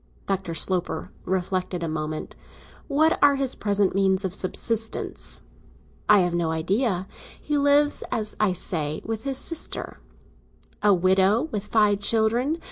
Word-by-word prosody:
Dr. 190 Hz, -3 st, -3 dB
Sloper 180 Hz, +1 st, -2 dB
reflected 185 Hz, -1 st, -2 dB
a -, -, -2 dB
moment. 155 Hz, 0 st, -4 dB, 0.5 s
"What 315 Hz, +3 st, +2 dB
are 285 Hz, -1 st, +6 dB
his 270 Hz, -2 st, -2 dB
present 200 Hz, -2 st, 0 dB
means 190 Hz, 0 st, +1 dB
of 185 Hz, -, -3 dB
subsistence?" 220 Hz, +4 st, -1 dB, 0.7 s
"I 210 Hz, -2 st, +7 dB
have 175 Hz, -1 st, 0 dB
no 170 Hz, -1 st, 0 dB
idea. 185 Hz, +4 st, 0 dB, 0.3 s
He 295 Hz, -, -3 dB
lives, 285 Hz, +1 st, +3 dB
as 215 Hz, -2 st, -2 dB
I 210 Hz, -3 st, +3 dB
say, 160 Hz, -4 st, -1 dB
with 225 Hz, +1 st, -4 dB
his 270 Hz, -1 st, +1 dB
sister." 330 Hz, +3 st, -1 dB, 0.8 s
"A 210 Hz, -, +4 dB
widow, 190 Hz, +5 st, +3 dB
with 210 Hz, -4 st, -3 dB
five 210 Hz, -2 st, +3 dB
children? 230 Hz, +8 st, +1 dB
200 Hz, 135 wpm, -24 LUFS, 180-230 Hz, 0.8 s, I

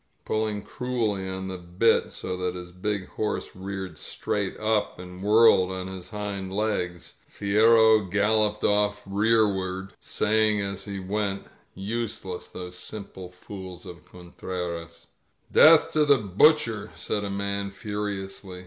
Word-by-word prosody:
Pulling 110 Hz, -1 st, -1 dB
cruelly 110 Hz, -7 st, -2 dB
on 95 Hz, 0 st, -4 dB
the 95 Hz, -1 st, -5 dB
bit, 90 Hz, +6 st, +2 dB
so 90 Hz, -, -4 dB
that 90 Hz, 0 st, -2 dB
his 90 Hz, 0 st, -8 dB
big 95 Hz, +1 st, -3 dB
horse 105 Hz, -, -3 dB
reared 95 Hz, -3 st, -6 dB
strai^t 100 Hz, -2 st, -3 dB
up 110 Hz, -1 st, 0 dB
and 90 Hz, 0 st, -10 dB
whirled 105 Hz, -2 st, +5 dB
on 95 Hz, 0 st, -4 dB
his 95 Hz, -1 st, -7 dB
hind 100 Hz, -2 st, -4 dB
legs, 95 Hz, -4 st, -2 dB
Fierro 110 Hz, 0 st, +4 dB
galloped 105 Hz, +1 st, +2 dB
off 105 Hz, 0 st, +2 dB
rearward, 100 Hz, -2 st, +1 dB
saying 110 Hz, 0 st, +1 dB
as 100 Hz, -1 st, -4 dB
he 100 Hz, -2 st, -5 dB
went, 100 Hz, +1 st, -2 dB, 0.3 s
^Useless, 100 Hz, -3 st, -4 dB
those 90 Hz, 0 st, -7 dB
simple 95 Hz, -3 st, -8 dB
fools 90 Hz, 0 st, -10 dB
of 85 Hz, -1 st, -10 dB
Con 90 Hz, -1 st, -15 dB
treras 85 Hz, -2 st, -5 dB, 0.2 s
" -, -, -31 dB
'^eath 160 Hz, 0 st, +7 dB
to 155 Hz, -1 st, +3 dB
the 145 Hz, -2 st, +5 dB
Butcher 110 Hz, -, +3 dB
f -, -, -17 dB
said 105 Hz, -, -2 dB
a 100 Hz, -, -3 dB
man 100 Hz, 0 st, -2 dB
furiously. 100 Hz, -2 st, -5 dB
100 Hz, 140 wpm, -26 LUFS, 95-105 Hz, 0.3 s, ^eath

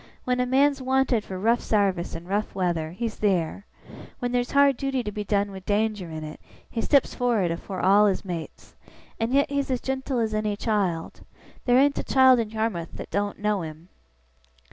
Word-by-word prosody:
When 250 Hz, 0 st, 0 dB
a 250 Hz, -, +1 dB
man's 275 Hz, +2 st, +3 dB
wanted 260 Hz, -3 st, +1 dB
for 190 Hz, -, -6 dB
rough 230 Hz, +5 st, +2 dB
sarvice 195 Hz, -6 st, 0 dB
in 165 Hz, +1 st, -7 dB
rough 205 Hz, +3 st, -2 dB
weather, 175 Hz, -4 st, -1 dB
he's 220 Hz, +6 st, -4 dB
theer. 195 Hz, -1 st, 0 dB, 0.5 s
When 245 Hz, -1 st, -3 dB
there's 245 Hz, 0 st, 0 dB
hard 280 Hz, -1 st, +5 dB
duty 270 Hz, -1 st, -2 dB
to 210 Hz, -, -4 dB
be 210 Hz, 0 st, -4 dB
done 200 Hz, 0 st, 0 dB
with 190 Hz, -1 st, -9 dB
danger 210 Hz, -3 st, 0 dB
in 160 Hz, -1 st, -6 dB
it, 155 Hz, 0 st, -8 dB, 0.3 s
he 230 Hz, -, -3 dB
steps 280 Hz, +1 st, +3 dB
for'ard 230 Hz, -8 st, +1 dB
afore 185 Hz, +3 st, -5 dB
all 200 Hz, +3 st, +5 dB
his 195 Hz, 0 st, -1 dB
mates. 170 Hz, -4 st, -7 dB, 0.5 s
And 225 Hz, +1 st, -1 dB
yet 280 Hz, +1 st, +2 dB
he's 280 Hz, -1 st, -1 dB
as 255 Hz, -2 st, 0 dB
gentle 265 Hz, 0 st, -3 dB
as 220 Hz, -2 st, 0 dB
any 215 Hz, -1 st, -1 dB
child. 200 Hz, -7 st, -2 dB, 0.4 s
There 245 Hz, 0 st, +4 dB
ain't 280 Hz, +1 st, +3 dB
a -, -, -2 dB
child 260 Hz, -2 st, +5 dB
in 225 Hz, -2 st, -1 dB
Yarmouth 220 Hz, -6 st, -3 dB
that -, -, -8 dB
doen't 205 Hz, 0 st, -1 dB
know 210 Hz, -2 st, 0 dB
him. 160 Hz, +2 st, -9 dB
210 Hz, 195 wpm, -25 LUFS, 190-250 Hz, 0.5 s, hard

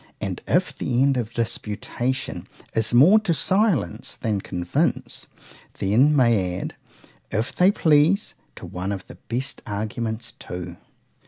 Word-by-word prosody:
And, -, -, -4 dB
if -, -, +1 dB
the 125 Hz, +2 st, +1 dB
end 140 Hz, -1 st, +3 dB
of 120 Hz, -3 st, -2 dB
disputation 115 Hz, +3 st, -3 dB, 0.3 s
is 110 Hz, -1 st, +1 dB
more 155 Hz, -, +7 dB
to 190 Hz, -6 st, 0 dB
silence 185 Hz, -, +1 dB
than 105 Hz, -3 st, -1 dB
convince,—they 90 Hz, +2 st, -3 dB
may 115 Hz, -9 st, +4 dB
add, -, -, -5 dB, 0.6 s
if 110 Hz, +2 st, -2 dB
they 180 Hz, +1 st, +5 dB
please, 165 Hz, +2 st, +3 dB, 0.2 s
to -, -, -9 dB
one 90 Hz, +2 st, -4 dB
of 95 Hz, -2 st, -5 dB
the -, -, -13 dB
best 130 Hz, +4 st, -2 dB
arguments 110 Hz, +2 st, -3 dB
too. 90 Hz, -1 st, -8 dB
115 Hz, 130 wpm, -24 LUFS, 100-145 Hz, 0.6 s, more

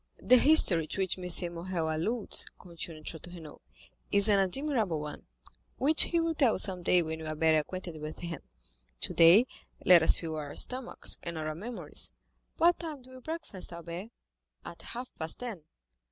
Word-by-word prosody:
"The 255 Hz, -, +5 dB
history 195 Hz, -, +5 dB
to 195 Hz, -, -3 dB
which 185 Hz, 0 st, 0 dB
M. 180 Hz, -1 st, +1 dB
Morrel 170 Hz, -2 st, -3 dB
alludes," 215 Hz, +8 st, -2 dB
continued 165 Hz, -3 st, -8 dB
Château 175 Hz, +2 st, -6 dB
Renaud, 160 Hz, -4 st, -12 dB, 0.5 s
"is 200 Hz, +1 st, +7 dB
an 200 Hz, -1 st, +4 dB
admirable 215 Hz, -, 0 dB
one, 150 Hz, 0 st, -8 dB, 0.5 s
which 305 Hz, +4 st, +3 dB
he 340 Hz, -, 0 dB
will 330 Hz, 0 st, 0 dB
tell 270 Hz, -8 st, +2 dB
you -, -, -2 dB
some 185 Hz, -3 st, +4 dB
day 175 Hz, 0 st, +3 dB
when 160 Hz, 0 st, -5 dB
you 160 Hz, -, -7 dB
are 155 Hz, -, -4 dB
better 160 Hz, 0 st, +3 dB
acquainted 170 Hz, 0 st, -6 dB
with 155 Hz, +1 st, -7 dB
him; 170 Hz, -3 st, -6 dB, 0.6 s
today 170 Hz, -, +5 dB, 0.4 s
let 180 Hz, -2 st, +8 dB
us 160 Hz, -, +5 dB
fill 160 Hz, -2 st, -5 dB
our 145 Hz, -2 st, -6 dB
stomachs, 255 Hz, 0 st, -3 dB
and 170 Hz, -1 st, -6 dB
not 155 Hz, -1 st, -4 dB
our 155 Hz, -, -3 dB
memories. 220 Hz, +9 st, -5 dB, 0.5 s
What 345 Hz, +1 st, +3 dB
time 310 Hz, -6 st, -7 dB
do 260 Hz, -, -16 dB
you 255 Hz, 0 st, -12 dB
breakfast, 315 Hz, -, -6 dB
Albert?" 170 Hz, +4 st, -8 dB, 0.6 s
"At 170 Hz, -, -10 dB
half 250 Hz, +2 st, -7 dB
past 160 Hz, -1 st, -4 dB
ten." 220 Hz, -11 st, -7 dB
180 Hz, 180 wpm, -29 LUFS, 160-245 Hz, 0.6 s, let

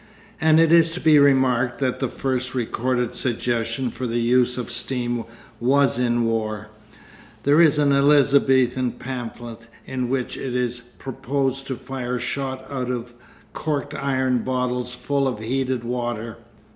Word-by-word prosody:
And 160 Hz, 0 st, +5 dB
it 165 Hz, -1 st, +4 dB
is 165 Hz, -1 st, +6 dB
to -, -, -4 dB
be 155 Hz, -3 st, +5 dB
remarked 130 Hz, -3 st, +3 dB
that 130 Hz, -2 st, -1 dB
the 135 Hz, -, 0 dB
first 130 Hz, 0 st, -3 dB
recorded 125 Hz, 0 st, -1 dB
suggestion 120 Hz, 0 st, -1 dB
for 130 Hz, -, -4 dB
the 115 Hz, +1 st, -1 dB
use 125 Hz, +1 st, +2 dB
of 125 Hz, -1 st, -4 dB
steam 120 Hz, -1 st, -2 dB, 0.3 s
was 135 Hz, +1 st, +3 dB
in 120 Hz, -1 st, +1 dB
war; 110 Hz, -2 st, -2 dB, 0.7 s
there 145 Hz, +4 st, +5 dB
is 155 Hz, -3 st, +5 dB
an 145 Hz, -1 st, +3 dB
Elizabethan 135 Hz, -3 st, +3 dB
pamphlet 120 Hz, -3 st, -7 dB, 0.2 s
in 125 Hz, -2 st, -3 dB
which 130 Hz, -1 st, -2 dB
it 125 Hz, -2 st, -4 dB
is 125 Hz, -1 st, -1 dB
proposed 135 Hz, +2 st, -3 dB
to 130 Hz, -, -3 dB
fire 125 Hz, -1 st, -4 dB
shot 130 Hz, +2 st, -4 dB
out 130 Hz, -3 st, -4 dB
of 120 Hz, -1 st, -4 dB, 0.4 s
corked 145 Hz, -2 st, -3 dB
iron 130 Hz, -3 st, 0 dB
bottles 125 Hz, 0 st, -2 dB
full 140 Hz, -1 st, 0 dB
of 125 Hz, -, -2 dB
heated 130 Hz, +2 st, -2 dB
water. 120 Hz, -2 st, -3 dB
125 Hz, 145 wpm, -23 LUFS, 120-135 Hz, 0.7 s, is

